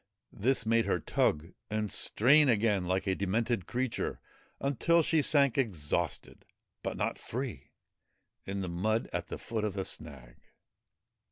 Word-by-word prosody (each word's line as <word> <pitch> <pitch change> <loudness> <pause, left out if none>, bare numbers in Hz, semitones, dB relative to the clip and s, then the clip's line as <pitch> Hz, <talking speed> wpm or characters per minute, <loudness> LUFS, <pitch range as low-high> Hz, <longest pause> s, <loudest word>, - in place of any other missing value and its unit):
This 125 +2 +1
made 115 +1 +2
her - - +1
tug 80 +4 0 0.2
and 105 -1 -2
strain 140 +5 +4
again 105 -5 +2
like 95 +1 0
a 95 - +1
demented 100 +1 -1
creature, 125 -1 -2 0.4
until 145 +5 +2
she 160 0 +3
sank 140 -3 +3
exhausted, 90 - -1 0.4
but - - -4
not - - -1
free, 125 0 -5 0.7
in 100 0 -4
the 95 - -3
mud 105 +6 0
at - - -2
the - - -5
foot 110 -2 -4
of 105 -2 -2
the 95 -1 -2
snag. 65 -7 -7
110 Hz, 145 wpm, -31 LUFS, 95-130 Hz, 0.7 s, strain